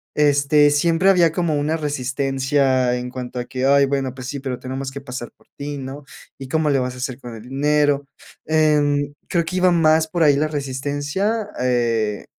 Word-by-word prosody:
este, 145 0 +4
siempre 165 +5 +3
había 175 -4 +4
como 170 -3 0
una 155 +3 0
resistencia 135 -2 0
en 125 0 -4
cuanto 125 -1 -6
a 120 - -4
que: 130 +1 -3
"Ay, 140 0 +5
bueno, 135 -2 -1
pues, 130 -1 -7
sí, 140 +1 -4
pero 130 -2 -4
tenemos 135 +1 -5
que 140 - -7
pasar 125 -3 -7
por - - -28
ti, 145 0 -5
¿no? 135 +2 -7 0.4
¿Y 135 - -7
cómo 155 0 +1
le 135 -2 +2
vas 125 0 -3
a - - -11
hacer 130 0 -4
con 120 -3 -9
el 110 - -10
dinero?", 145 +2 +1 0.4
em, 145 -2 +2 0.2
creo 170 -2 +1
que 185 - -5
iba 185 0 +4
más 160 -1 +3
por 170 0 0
ahí 145 -2 +5
la 155 +1 +1
resistencia, 145 - -2
eh, 115 -4 0
140 Hz, 195 wpm, -21 LUFS, 130-150 Hz, 0.4 s, Ay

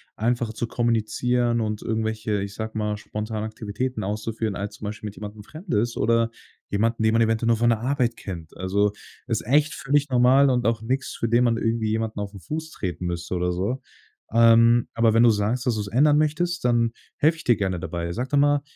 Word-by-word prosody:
einfacher 120 0 -1
zu 120 - -3
kommunizieren 120 +1 0
und 105 -1 -2
irgendwelche, 110 -2 -1
ich 100 0 -5
sage 110 0 -5
mal, 105 -1 -1
spontane 105 +1 -4
Aktivitäten 110 +1 -4
auszuführen, 110 +1 -3
als 105 +1 -5
zum 105 - -9
Beispiel 105 +1 -5
mit 105 - -8
jemandem 105 0 -8
Fremdes 120 - -2
oder 115 +1 +2 0.4
jemanden, 115 +2 0
den 110 - +3
man 115 - +3
eventuell 115 +1 +1
nur 115 -1 +3
von 120 +1 +3
der 115 -2 +2
Arbeit 125 -2 0
kennt. 85 -5 -8
Also 100 +2 +1 0.4
ist 115 -3 -2
echt 145 +5 +3
völlig 145 +1 0
normal 130 +2 +5
und 125 -2 +1
auch 115 -1 +1
nix, 130 +4 -2
für 115 - -2
den 120 +2 +4
man 115 -1 +2
irgendwie 115 -1 0
jemanden 110 -1 -2
auf 105 0 -5
'n 100 - -9
Fuß 160 - -5
treten 90 -2 -4
müsste 85 +1 -3
oder 90 0 0
so. 100 +9 -2 0.5
Ähm, 115 +1 +5
aber 115 -1 +3
wenn 115 +1 +5
du 120 - +7
sagst, 110 +3 0
dass 120 - +2
du's 105 -2 -3
ändern 145 +7 +4
möchtest, 155 +1 0
dann 115 -1 +3 0.3
helfe 160 +2 +3
ich - - -10
dir 120 - +4
gerne 95 -3 -2
dabei. 85 -1 -4
Sag 125 +7 -3
doch 145 - +1
mal. 145 0 +3
115 Hz, 210 wpm, -24 LUFS, 105-125 Hz, 0.5 s, du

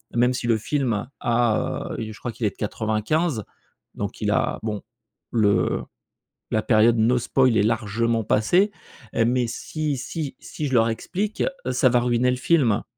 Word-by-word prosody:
même 125 +1 +3
si 125 - -4
le 115 -1 +3
film 120 -3 -1
a, 120 -2 0
heu 110 -1 -4
je 105 - -12
crois 120 - -4
qu'il 115 - -4
est 105 - +1
de - - -24
95 110 - -1 0.5
donc - - -5
il - - 0
a - - +1
bon 105 -2 -4 0.5
le 105 -4 +2 0.7
la 110 - +2
période 115 +1 +4
no 115 +3 +3
spoil 125 -1 +2
est 100 - +4
largement 115 +1 0
passée 175 - +3 0.6
mais 125 0 +1
si 150 +4 -3
si 140 +3 -5
si 150 -2 -5
je 130 - -2
leur 115 -1 +4
explique, 200 - -3 0.2
heu, - - 0
ça 130 - +4
va 125 0 +3
ruiner 120 +1 +2
le 125 - 0
film. 130 -6 +2
120 Hz, 170 wpm, -24 LUFS, 110-130 Hz, 0.7 s, période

